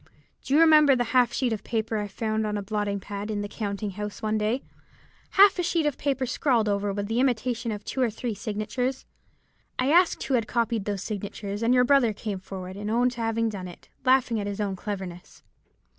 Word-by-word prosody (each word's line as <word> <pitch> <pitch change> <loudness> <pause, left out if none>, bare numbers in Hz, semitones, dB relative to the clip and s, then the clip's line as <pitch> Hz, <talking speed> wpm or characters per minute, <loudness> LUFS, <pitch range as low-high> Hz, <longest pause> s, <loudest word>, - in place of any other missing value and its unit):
Do 275 - 0
you - - +6
remember 305 -4 +7
the 245 - +1
half 250 -2 +4
sheet 245 -1 0
of 210 - -5
paper 225 -1 -1
I 210 -1 -2
found 215 +1 -2
on 210 0 -2
a 205 - -4
blotting 205 -1 -2
pad 200 +2 -6
in 210 -1 -2
the - - -3
counting 205 0 -4
house 210 +1 -6
one 215 -1 -1
day; 215 +5 0 0.7
half 395 -1 +7
a - - +3
sheet 335 -2 0
of 295 -3 -1
paper 270 -2 0
scrawled 245 -3 +1
over 200 0 0
with 200 +1 -3
the 225 +3 0
imitation 245 -2 0
of 210 -1 -6
two 265 - -3
or 245 - +3
three 225 +2 -4
signatures? 215 +6 -3 0.7
I 255 +3 +1
asked 355 +2 +4
who 270 - -2
had 230 -4 +2
copied 230 -3 0
those 200 -2 -3
signatures, 205 0 -5
and 230 +1 +2
your 250 0 +5
brother 250 -4 +4
came 205 -2 -4
forward 185 0 -8
and 205 +1 -4
owned 245 +3 +2
to 240 -1 -6
having 225 0 0
done 195 -4 -5
it, 175 - -13
laughing 255 -3 +3
at 200 - -3
his 205 0 -4
own 200 -2 -1
cleverness. 185 -3 -7
220 Hz, 220 wpm, -26 LUFS, 205-250 Hz, 0.7 s, remember